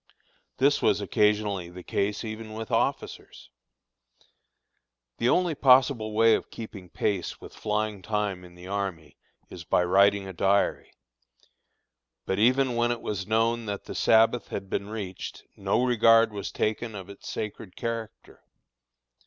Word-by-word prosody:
This - - +3
was - - +3
occasionally 105 -4 +1
the 90 +1 -10
case 100 +3 -2
even 110 0 -7
with 110 0 -6
officers. 60 - -2 1.7
The 120 - +2
only 175 +1 +2
possible 130 -5 +4
way 115 +1 +5
of - - -1
keeping 100 -5 -9
pace 95 -1 -2
with - - -12
flying 105 -1 -2
time 105 -2 -2
in 90 -1 -14
the 90 +1 -12
army, 95 -7 -4 0.3
is 85 - -8
by 90 - +2
writing 100 +2 +3
a 95 - -7
diary. 100 +3 +1 1.3
But 95 - -1
even 125 +2 +3
when 120 0 +2
it 120 -1 -3
was 100 -2 -3
known 115 +1 +1
that 100 -1 -4
the - - -8
Sabbath 115 +2 +3
had 95 -1 -6
been 100 - -2
reached, 100 -4 -6
no 125 - 0
regard 115 -2 +5
was 100 -1 -5
taken 110 +1 -2
of 95 -2 -8
its 100 -1 -10
sacred 105 -3 -6
character. 115 -2 -6
105 Hz, 145 wpm, -27 LUFS, 95-115 Hz, 1.7 s, way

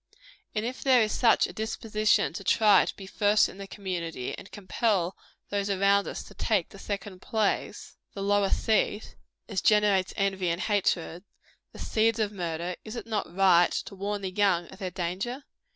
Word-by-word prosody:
And 215 +1 -1
if 250 +2 -5
there 255 -4 +5
is 215 - -1
such 235 -3 +4
a - - -7
disposition 215 -1 0
to 195 - -6
try 210 +2 +5
to - - -5
be 195 - -10
first 205 +2 +3
in 195 - -12
the 195 - -7
community, 170 -10 -4
and - - -11
to - - -23
compel 195 -3 -1 0.3
those 200 0 -1
around 200 +1 +3
us - - -5
to - - -14
take 205 -7 0
the 195 - -13
second 200 -2 -5
place 215 -3 -2 0.2
the 195 - -4
lower 200 0 +2
seat 215 -1 0 0.3
as 200 -4 -2
generates 205 -3 +3
envy 190 -2 0
and 170 +1 -1
hatred 180 -4 0 0.5
the - - -13
seeds 225 +1 +1
of 215 -2 0
murder 175 -2 -3
is 215 +2 -8
it - - -6
not 215 -6 -3
right 180 -3 +5
to - - -4
warn 200 +1 -4
the 190 - -3
young 185 -3 +2
of 190 - -13
their 190 -3 -3
danger? 190 +9 -4
200 Hz, 185 wpm, -27 LUFS, 185-215 Hz, 0.5 s, there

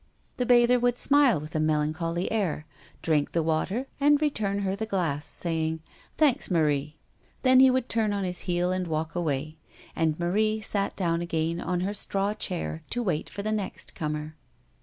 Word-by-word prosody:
The 250 - -1
bather 245 0 +5
would 245 0 +1
smile 280 - +4
with 155 +2 -9
a 155 - 0
melancholy 155 +3 0
air, 185 -9 -1 0.4
drink 150 -3 +1
the 165 - +1
water, 175 +10 0
and 290 +1 +4
return 210 -10 -1
her 195 -1 -1
the 220 +2 -4
glass, 165 -8 -1
saying, 160 -1 -2 0.4
"Thanks, 290 -3 +2
Marie." 150 -4 +1 0.5
Then 255 -1 +6
he 265 0 +8
would 255 -1 +1
turn 225 -3 0
on 200 -1 -1
his 180 -1 -3
heel 175 +1 +1
and 185 -1 -1
walk 160 0 -2
away. 155 -2 -2 0.4
And 160 -1 0
Marie 215 +5 +1
sat 200 -1 -2
down 170 -3 0
again 165 0 -1
on 180 0 -1
her 195 +3 -1
straw 200 0 0
chair 180 -6 -3
to 245 - -1
wait 175 -8 -1
for 200 - -6
the 215 - -1
next 210 -3 -4
comer. 150 0 -4
180 Hz, 180 wpm, -27 LUFS, 160-215 Hz, 0.5 s, he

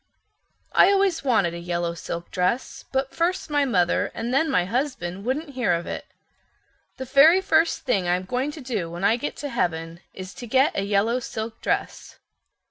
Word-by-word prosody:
I 390 - +6
always 390 -5 +2
wanted 220 -10 +2
a 170 - -6
yellow 170 0 -2
silk 170 0 -6
dress, 185 +8 -1
but 265 0 -1
first 340 -1 -1
my 290 -1 +2
mother 180 -9 +1
and 235 +2 -3
then 315 +4 +2
my 180 -9 +2
husband 200 -5 -3
wouldn't 285 +4 -2
hear 250 -8 +1
of 170 0 -2
it. - - -6 0.9
The 260 - -5
very 285 +7 +6
first 330 -4 +2
thing 200 -9 0
I'm 180 +1 0
going 255 +8 -1
to 305 - -9
do 220 -10 -3
when 175 +2 -7
I 210 +3 +4
get 245 +5 -4
to 290 - -5
heaven 165 -7 -2
is 185 0 -9
to 240 - -9
get 265 +5 +3
a - - 0
yellow 210 +5 +1
silk 225 -2 -6
dress." - - -3
235 Hz, 185 wpm, -24 LUFS, 180-275 Hz, 0.9 s, I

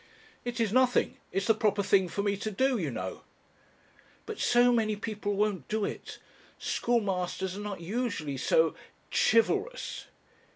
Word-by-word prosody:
"It 245 -1 -4
is 220 -3 +1
nothing 255 -1 +3
it's 195 - -1
the 225 - +5
proper 210 -2 +1
thing 190 -2 +3
for 200 +4 -2
me 200 -1 +1
to 205 +2 -4
do, 255 +4 +1
you 160 -6 -1
know." 95 -7 -5 1.0
"But - - -6
so 245 0 +4
many 220 -3 +2
people 205 -1 -3
won't 200 -7 0
do 215 -1 0
it. - - -6 0.4
Schoolmasters 190 -5 -1
are - - -6
not 205 -4 -5
usually 190 - -2
so 480 - +3 0.4
chivalrous." 405 - +1
210 Hz, 150 wpm, -29 LUFS, 190-235 Hz, 1.0 s, the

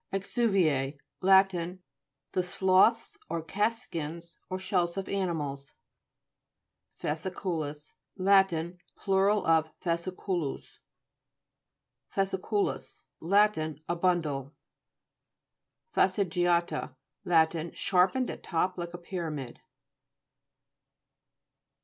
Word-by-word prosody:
Exu'vi 195 0 +1
E 140 -2 0 0.2
Lat. 190 +1 +6 0.8
The 185 - +1
sloughs 190 - +3
or 165 - -2
cast 210 +8 0
skins, 170 -5 -6
or 185 - -2
shells 180 -2 0
of 195 - -3
animals. 150 -8 -3 1.3
FASCI'CUI.IS 155 -2 -3 0.2
Lat. 195 0 +5 0.5
Plur.of 190 -5 +2
fasciculus. 170 -2 -3 1.4
FASCI'CUI.US 195 -7 -1 0.2
Lat. 205 +5 +4
A 155 +2 -3
bundle. 160 -6 0 1.4
FASTIGIA'TA 175 -6 +1 0.3
Lat. 165 -1 +2
Sharpened 195 +8 +2
at - - -9
top 180 +1 -1
like 175 0 -5
a - - -5
pyramid. 165 -7 -5
175 Hz, 75 wpm, -29 LUFS, 160-195 Hz, 1.4 s, Lat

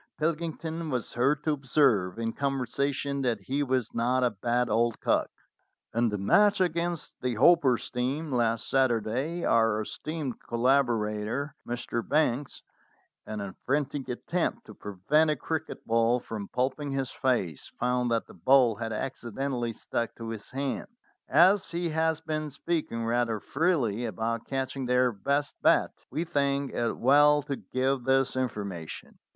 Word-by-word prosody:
Pilkington 165 0 -2
was 125 -5 -2
heard 140 +5 +1
to 155 - +1
observe 130 -9 +2
in 115 0 -2
conversation 140 +1 -1
that 120 -5 0
he 135 +8 -2
was 130 -4 0
not 125 +2 +1
a 125 - +3
bad 120 +4 0
old 115 +1 +1
cock. - - +1 0.6
"In 115 0 +2
the 105 - -2
match 200 - +4
against 170 -2 -1
the 125 -2 -1
Hopper's 135 -1 +4
team 135 +5 -2
last 115 -2 +1
Sat 135 -1 +3
urday, 125 +9 -1
our 115 -2 +3
esteemed 150 +3 -5
collaborator 120 0 0
Mr. 120 -1 -2
Banks, 145 -1 0 0.6
in 105 -1 -4
a 100 -2 -6
frantic 140 0 -1
attempt 180 - -2
to - - -11
prevent 105 - +1
a 150 - +2
cricket 160 +3 -4
ball 115 +2 +3
from 105 -4 -6
pulping 135 +3 -1
his 135 -2 -2
face, 115 - -1
found 125 0 -1
that 115 -1 0
the - - -15
ball 120 +3 +4
had 115 -1 -4
accidentally 120 +1 -3
stuck 115 +1 -3
to 115 -1 -7
his 110 -2 -6
hands. 140 - -4 0.3
As 180 +7 +5
he 170 0 -2
has 160 0 0
been 155 -1 -3
speaking 145 -6 -2
rather 115 -1 0
freely 125 - 0
about 115 +2 -3
catching 135 -1 -3
their 125 0 +3
best 140 +8 -1
bat, - - +4 0.2
we 160 - -2
think 140 -3 0
it 120 -1 -1
well 145 +3 +5
to 140 -1 -3
give 130 -1 -1
this 135 -1 +2
information. 100 -10 -4
130 Hz, 150 wpm, -28 LUFS, 115-145 Hz, 0.6 s, As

